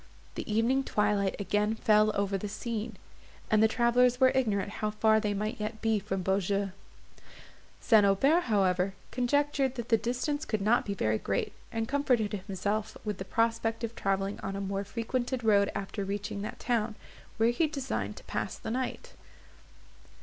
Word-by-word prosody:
The - - -5
evening 235 +5 +2
twilight 205 -4 +1
again 210 +2 0
fell 215 -1 +4
over 200 0 0
the 200 +2 -3
scene, 220 +1 -4 0.5
and 215 -1 +5
the 220 - +6
travellers 245 +2 +3
were 260 -1 +6
ignorant 210 -6 0
how 215 - +1
far 220 +1 +3
they 210 -2 -1
might 215 +2 -3
yet 215 +1 -4
be 220 -1 +1
from 195 -2 -3
Beaujeu. 195 +1 0 1.1
St. 220 -3 +5
Aubert, 275 - +3
however, 195 -3 +1 0.2
conjectured 270 +1 +1
that 235 -1 -5
the 225 - +5
distance 255 +6 -2
could 215 - -1
not 225 +3 +3
be 200 - -2
very 110 - 0
great, 100 0 -2 0.2
and 225 0 -2
comforted 250 -6 +1
himself 205 +2 -2
with 210 -3 -3
the 190 - -4
prospect 225 +2 0
of 230 0 -3
travelling 195 +1 -1
on 195 0 -4
a - - -3
more 195 0 -2
frequented 240 +4 -3
road 200 -2 +4
after 200 +1 -3
reaching 200 +1 -4
that 210 - -6
town, 225 -3 0 0.4
where 225 +1 +4
he 315 +7 +1
designed 275 -3 -3
to - - -11
pass - - -3
the 220 - -5
night. 255 +2 -3
215 Hz, 170 wpm, -30 LUFS, 200-240 Hz, 1.1 s, the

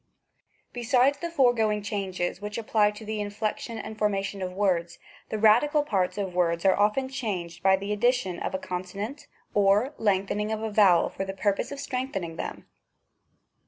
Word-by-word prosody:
Besides 250 +3 +2
the 340 - -3
foregoing 235 -9 +2
changes, 190 -3 -3
which 210 0 -5
apply 215 -2 +2
to 210 +1 -9
the 215 0 -3
inflection 215 +2 -3
and 220 0 -6
formation 200 -2 -1
of 185 -1 -3
words, 180 -3 0 0.3
the 220 - -2
radical 245 +8 +4
parts 195 -10 0
of 195 -3 -3
words 170 0 +1
are 190 - +5
often 210 +6 +2
changed 190 -10 -4
by 190 +1 +5
the 200 +2 -3
addition 210 -5 +1
of - - -3
a - - +1
conso 185 0 -6
nant 225 +9 -5 0.3
or 205 +7 +3
the - - -12
lengthening 205 +1 +1
of 220 0 -2
a 220 - -2
vowel 195 -5 +5
for - - -4
the 195 0 -5
purpose 200 +4 0
of 280 - -6
strengthening 250 - -3
them. - - -6
210 Hz, 175 wpm, -27 LUFS, 190-225 Hz, 0.3 s, are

